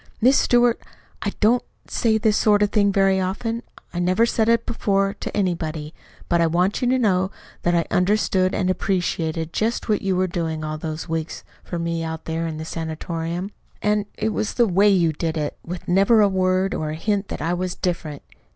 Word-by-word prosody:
"Miss 255 +4 +5
Stewart, 240 -1 +3 0.4
I - - -1
don't 235 +3 +4 0.2
say 220 -2 +1
this 220 -1 +2
sort 210 -1 +4
of 205 - +1
thing 200 -2 +3
very 195 -1 +3
often. 225 +5 -2 0.3
I 175 - -2
never 185 +6 +3
said 225 -1 +1
it 230 0 +3
before 195 -4 0
to - - -4
anybody. 160 -5 -2 0.3
But 170 -1 +2
I 165 - +4
want 180 +7 +1
you 245 - +2
to 260 - +3
know 190 -6 +2 0.3
that 175 0 +1
I 170 - +2
understood 185 0 +2
and 185 -1 +1
appreciated 165 -4 -1
just 225 +2 -1
what 210 - +2
you 190 -1 0
were 185 +1 +2
doing 165 -3 -3
all 155 0 -4
those 155 +1 -5
weeks 160 -1 -4 0.2
for 175 - -5
me 170 0 -2
out 160 0 -5
there 165 +1 -2
at 160 -1 -5
the 160 - -5
sanatorium. 165 +3 -4 0.3
And 210 -1 +1
it 220 - 0
was 215 0 -2
the 240 - +4
WAY 200 +1 +4
you 175 -5 +3
did 160 +1 -2
it, 150 -1 -2
with 175 +1 -7
never 195 +5 +4
a 205 - +6
word 185 0 +1
or 155 - -2
a 155 - -3
hint 200 +4 -1
that - - -5
I 165 +3 -1
was 180 0 -2
different. 165 -5 -3
185 Hz, 205 wpm, -22 LUFS, 165-210 Hz, 0.4 s, a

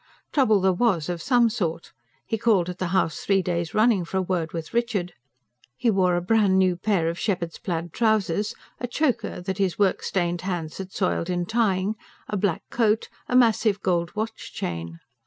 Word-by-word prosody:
Trouble 220 -8 +4
there 190 0 +3
was, 180 -6 +1
of 175 -1 -3
some 245 -3 +4
sort: 170 -7 -3 0.3
he - - -1
called 205 -5 +2
at 180 - -6
the 185 - -1
house 170 -2 +1
three 195 -2 +1
days 170 -2 -2
running 215 -3 +4
for 180 +3 -4
a - - +2
word 175 -3 -1
with 165 -2 -6
Richard. 230 -7 -1 0.6
He 235 - +2
wore 185 -3 +2
a 175 - 0
brand 200 -1 +3
new 185 -1 +3
pair 180 -2 0
of 170 +1 -2
shepherd's 175 -5 -2
plaid 170 -2 -4
trousers, 210 -3 +1 0.2
a 245 - -3
choker 255 - -1
that 190 +2 -4
his 190 -3 +1
work 200 -3 +2
stained 175 -2 -1
hands 175 -4 -4
had 190 -1 -6
soiled 185 -3 -1
in 175 -1 -1
tying, 205 -2 +1 0.3
a - - -3
black 195 -4 0
coat, 225 -2 +1 0.2
a 250 - 0
massive 225 -4 +4
gold 175 -1 0
watch 220 +1 -4
chain. 85 -1 -5
190 Hz, 190 wpm, -25 LUFS, 175-215 Hz, 0.6 s, Trouble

